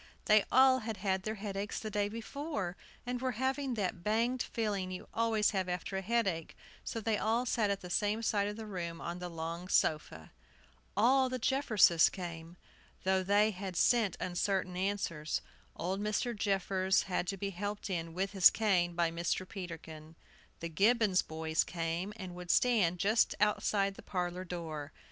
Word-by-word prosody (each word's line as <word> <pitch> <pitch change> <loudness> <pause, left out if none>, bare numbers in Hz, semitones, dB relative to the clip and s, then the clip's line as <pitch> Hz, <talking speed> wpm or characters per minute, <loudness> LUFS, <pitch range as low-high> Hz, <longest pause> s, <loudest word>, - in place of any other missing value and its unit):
They 215 -1 +5
all 260 0 +6
had 225 -2 -5
had 190 -1 0
their 215 +3 -3
headaches 200 0 -4
the 215 - -5
day 205 0 0
before, 230 - -4 0.3
and 245 0 -3
were 260 -1 -1
having 265 +1 -1
that 185 -5 -2
banged 235 +5 +1
feeling 205 -5 -2
you 185 0 -7
always 225 -2 +2
have 190 -3 -1
after 180 +2 -3
a 190 - -1
headache; 195 -6 -1 0.3
so 230 - -4
they 220 -1 0
all 230 +3 +1
sat 225 -3 +1
at 200 -1 -1
the 180 - -8
same 210 +4 +1
side 205 -2 +1
of 210 - -4
the 220 0 -7
room 170 -5 -5
on 175 +1 -5
the 180 0 -5
long 165 +2 -5
sofa. 150 - 0 0.7
All 260 +3 +4
the 255 - -2
Jefferses 225 - +4
came, 170 -2 -7 0.5
though 190 0 +2
they 205 +3 +3
had 190 -1 -6
sent 220 -1 +3
uncertain 185 0 -1
answers. 180 -5 -2 0.3
Old 185 +4 -2
Mr. 215 +3 -1
Jeffers 195 -2 +1
had 180 -1 -2
to 195 - -2
be 200 +1 -3
helped 205 +3 -4
in, 165 -4 -3
with 190 +1 -1
his 190 -3 +8
cane, 180 -6 +1
by 170 -1 +1
Mr. 170 +2 -2
Peterkin. 165 -4 -8 0.5
The 170 - -3
Gibbons 205 +2 +3
boys 160 0 -1
came, 170 +3 -3
and 185 -4 -7
would 180 0 -9
stand 205 -9 +3
just 210 +5 +2
outside 205 -1 +2
the - - -12
parlor 180 0 -3
door. 160 -4 -5
195 Hz, 170 wpm, -33 LUFS, 175-220 Hz, 0.7 s, his